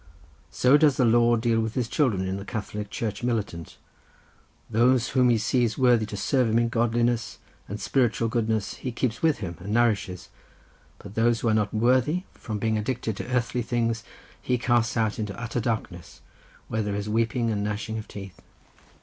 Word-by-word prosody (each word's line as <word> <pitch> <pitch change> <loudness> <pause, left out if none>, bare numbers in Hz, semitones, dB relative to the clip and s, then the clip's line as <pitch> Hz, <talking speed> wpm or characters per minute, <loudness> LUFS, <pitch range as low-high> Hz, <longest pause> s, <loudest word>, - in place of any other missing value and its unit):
So 125 - +4
does 150 -3 +4
the 125 - +4
Lord 120 0 +4
deal 115 -1 +2
with 110 0 -2
His 125 -3 0
children, 115 -10 +1
in 95 +1 -2
the 100 - -6
Catholic 105 0 -5
Church 105 -2 -4
Militant: 105 -9 -3 0.9
those 120 +2 +3
whom 125 -2 +3
He 120 - +4
sees 115 +1 +1
worthy 120 -4 +3
to 105 - -6
serve 125 +4 +1
Him 110 - +2
in 115 0 +2
godliness 120 0 0 0.3
and 105 +2 -5
spiritual 120 -3 +1
goodness 110 -2 -1
He 130 - -4
keeps 120 -1 -2
with 160 -8 +2
Him 85 -2 -7
and 95 +3 -6
nourishes, 110 -5 0 0.7
but - - -11
those 115 +1 +2
who 115 - +1
are - - +3
not 105 -1 +1
worthy 130 +10 +2
from 110 -2 -5
being 110 +1 0
addicted 115 -1 -2
to - - -5
earthly 125 -1 0
things 115 -1 -1 0.4
He 125 - 0
casts 120 -2 +1
out 110 -1 0
into 105 -2 -4
utter 120 +1 -3
darkness, 110 -7 -4 0.5
where 110 - -1
there 105 -1 -2
is 100 0 -3
weeping 115 +2 0
and 100 -1 -1
gnashing 105 +1 -3
of 110 - -9
teeth." 100 -5 -10
115 Hz, 185 wpm, -26 LUFS, 105-120 Hz, 0.9 s, So